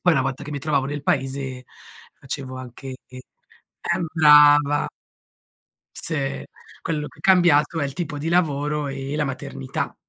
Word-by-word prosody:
Poi 175 - +4
una 130 - +2
volta 135 +1 -3
che 150 - -7
mi 145 - -3
trovavo 140 -2 0
nel 145 0 -4
paese, 135 -4 -2 0.5
facevo 130 -1 -6
anche 130 +1 -8
e 130 - -13 0.8
eh 180 - -2
brava! 145 -2 +6 1.1
Sì, 140 -4 -3 0.4
quello 150 -2 -3
che - - -14
è - - -14
cambiato 175 -4 +4
è 145 - 0
il 140 - -3
tipo 165 -2 -4
di 150 +3 -3
lavoro 150 -3 +1
e 135 +1 -5
la 150 -1 0
maternità. 125 - -4
145 Hz, 155 wpm, -23 LUFS, 135-150 Hz, 1.1 s, brava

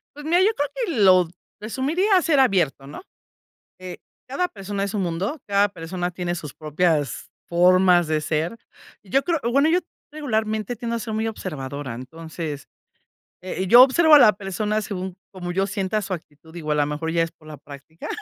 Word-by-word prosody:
Pues 295 0 -10
mira, 340 +3 +3
yo 395 - +5
creo 290 0 -1
que 460 -9 -2
lo 185 -2 +6
d 165 - -17 0.3
resumiría 325 - +1
ser 315 -5 +2
abierto, 175 - +2
¿no? 145 - -10 0.8
Eh, 185 -1 -7 0.3
cada 320 +8 -1
persona 200 - -4
es 200 - -5
un 205 - 0
mundo, 185 - -3
cada 200 0 +3
persona 180 -1 -5
tiene 175 -1 -3
sus 150 -5 -7
propias 155 -2 -1 0.2
formas 180 0 +4
de 155 -1 0
ser. 160 +7 -2 0.5
Y 195 - -19
yo 270 - +3
creo 340 -2 0
O 235 - -1
bueno, 280 +5 +3
yo 350 +3 +3 0.3
regularmente 220 -6 -2
tiendo 235 +1 -3
a - - -2
ser 220 -1 -5
muy 220 +1 -1
observadora. 145 - -5
Entonces, 155 +3 -7 0.7
eh, 185 0 -4
yo 240 +6 +9
observo 305 +4 +6
a - - +10
la 220 -6 +7
persona 210 +2 -2
según 190 -3 -5 0.2
como 180 -2 -5
yo 195 +2 0
sienta 200 +2 -2
su 195 - -5
actitud, 160 -1 -13
digo, 155 -3 -4
a - - +2
la 145 -1 +2
mejor 155 +2 -3
ya 165 -1 +2
es 165 - -2
por 155 - -22
la 150 - -8
práctica. 145 +3 -11
185 Hz, 195 wpm, -23 LUFS, 165-230 Hz, 0.8 s, a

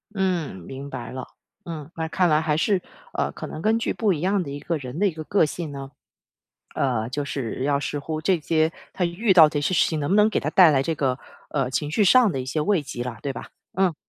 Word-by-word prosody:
嗯， 180 - 0
明 135 +10 -8
白 120 -4 -6
了。 130 0 -6 0.4
嗯， 155 -3 -6
那 160 -1 -2
看 180 +2 +2
来 155 0 +3
还 155 -2 0
是， 190 +2 +2 0.3
呃， - - -1
可 - - -7
能 155 - -7
根 220 +4 +3
据 230 - -1
不 215 -3 +1
一 155 -5 -1
样 195 +2 +1
的 155 - -5
一 140 - -5
个 165 +2 -2
人 130 0 -7
的 205 +3 +3
一 - - 0
个 160 -1 -7
个 185 +2 +3
性 155 0 -5
呢， 135 -1 -7 0.8
呃， 120 -4 0
就 140 +3 -3
是 130 -3 -4
要 140 0 +1
视 145 - -3
乎 155 +2 -4
这 180 +2 +2
些 160 0 +1 0.2
他 180 - -1
遇 190 +5 +1
到 165 -4 +8
这 150 -1 -2
些 145 - 0
事 170 - +4
情 160 - -2
能 145 - -2
不 195 - +4
能 210 0 +6
给 220 - 0
他 - - -2
带 180 -4 +7
来 135 -3 +3
这 165 +4 -1
个 135 -3 0 0.3
呃， 135 -4 0
情 145 +3 -1
绪 205 +7 +2
上 235 +2 +6
的 135 - -2
一 - - -4
些 140 +4 -2
慰 180 +1 +2
藉 120 -3 -5
了， 125 -2 -5
对 140 - -2
吧？ - - -8 0.3
嗯。 185 -2 +2
155 Hz, 275 characters per minute, -24 LUFS, 140-180 Hz, 0.8 s, 到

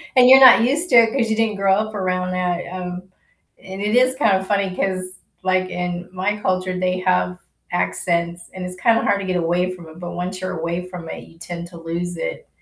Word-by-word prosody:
And 250 -1 +7
you're 265 +1 +10
not 255 -3 +9
used 290 +9 +1
to - - +3
it, 230 0 +6
'cause 235 -5 0
you 220 - +1
didn't 225 -1 0
grow 195 -1 +2
up 215 +1 -1
around 185 -1 -1
that. 180 -1 -1
Um, 180 0 -6 0.6
and 190 +1 -8
it 210 +3 0
is 255 +1 +4
kind 220 -8 +3
of 190 - -6
funny, 200 -2 0
'cause, 185 -1 -2 0.3
like, 185 0 +1
in 180 0 -4
my 190 +3 -1
culture, 185 -2 -1
they 185 0 0
have 180 0 0 0.3
accents, 170 -1 -1
and 185 -1 -6
it's 180 - -6
kinda 225 +5 +2
hard 200 -2 +1
to - - -5
get 185 -1 -1
away 175 +2 0
from 175 -3 -10
it, 160 +2 -13
but 175 -1 -6
once 185 +1 -5
you're 185 -2 -4
away 170 +2 -3
from 175 -3 -9
it, - - -7
you 165 - -18
tend 170 0 -7
to 170 - -13
lose 170 +2 -4
it. - - -5
185 Hz, 230 wpm, -21 LUFS, 180-205 Hz, 0.6 s, you're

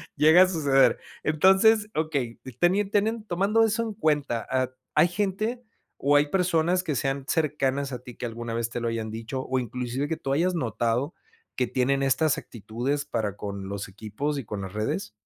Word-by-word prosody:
llega 160 +4 +6
a - - +3
suceder. 145 -7 +3 0.3
Entonces, 195 +7 +4
okey, 145 -7 -2 0.2
tenien 195 +3 +2
teniendo 215 +2 +1
tomando 200 +5 +2
eso 225 +1 +1
en 220 -2 -4
cuenta, 145 - 0
ah, 130 -1 0 0.2
¿hay 155 +3 +6
gente, 205 +6 -2 0.4
o, 145 +1 +2
hay 145 0 +4
personas 180 0 +2
que 155 -5 -2
sean 135 +1 -1
cercanas 140 -3 0
a 125 - -4
ti 125 -1 -12
que - - -4
alguna 115 0 -5
vez 115 0 -2
te 120 - -3
lo 120 - -2
hayan 115 -1 -3
dicho, 115 +4 -4
o 130 0 -1
inclusive 125 +3 -3
que 160 - -2
tú 135 - -2
hayas 175 +5 +1
notado 120 +1 -1 0.4
que 125 - 0
tienen 135 +3 +1
estas 145 +2 +2
actitudes 125 +6 -4
para 105 -8 -2
con 100 -2 -6
los 100 +1 -4
equipos 110 +9 -4
y 130 - -7
con 105 -1 -5
las 95 -1 -7
redes? 105 -2 -2
140 Hz, 185 wpm, -26 LUFS, 120-175 Hz, 0.4 s, llega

